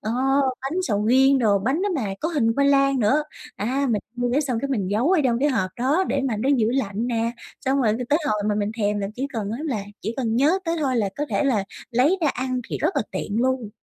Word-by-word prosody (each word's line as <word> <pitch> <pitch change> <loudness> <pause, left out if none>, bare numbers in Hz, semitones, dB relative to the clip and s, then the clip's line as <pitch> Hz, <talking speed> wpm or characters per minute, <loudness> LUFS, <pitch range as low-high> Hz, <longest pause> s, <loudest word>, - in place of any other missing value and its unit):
ờ, 215 - -3 0.5
bánh 330 +8 -2
sầu 210 - 0
riêng 265 +3 +5
đồ, 210 -5 +3
bánh 265 - 0
đó 410 - +1
mà 215 -10 -2
có 320 - -1
hình 235 -9 +1
khoai 280 +2 +3
lang 275 -1 +3
nữa. 260 +8 +3 0.3
À, 260 +7 -1
mình 210 - +1 0.2
mua 245 0 0
cái 280 - +3
xong 255 -6 -1
cái 280 - -2
mình 205 -8 -1
giấu 235 - +1
ở 375 -4 +4
trong 235 -2 +2
cái 290 +4 +2
hộp 195 -9 0
đó 285 +10 +2
để 275 - 0
mà 220 - -1
nó 235 +6 -1
giữ 220 -2 +2
lạnh 225 -3 -1
nè, 230 -1 -1 0.3
xong 270 +1 +2
rồi 215 -3 +3
t 220 - -1
tới 295 - +3
hồi 210 -6 0
mà 210 - +1
mình 205 0 -1
thèm 205 0 0
là 200 -1 -2
chỉ 265 +4 -2
cần 215 -5 -3
á 230 - -4
là 245 -10 -2 0.2
chỉ 220 +3 -4
cần 230 -4 -1
nhớ 300 +9 +3
tới 335 0 -1
thôi 260 -3 +1
là 210 -3 +1
có 295 - -1
thể - - 0
là 230 -8 +1 0.3
lấy 275 +11 +3
ra 310 - +3
ăn, 255 -1 -2
thì - - -3
rất 375 - 0
là 270 - +2
tiện 215 +3 -2
luôn. 260 -4 0
250 Hz, 270 wpm, -23 LUFS, 215-275 Hz, 0.5 s, riêng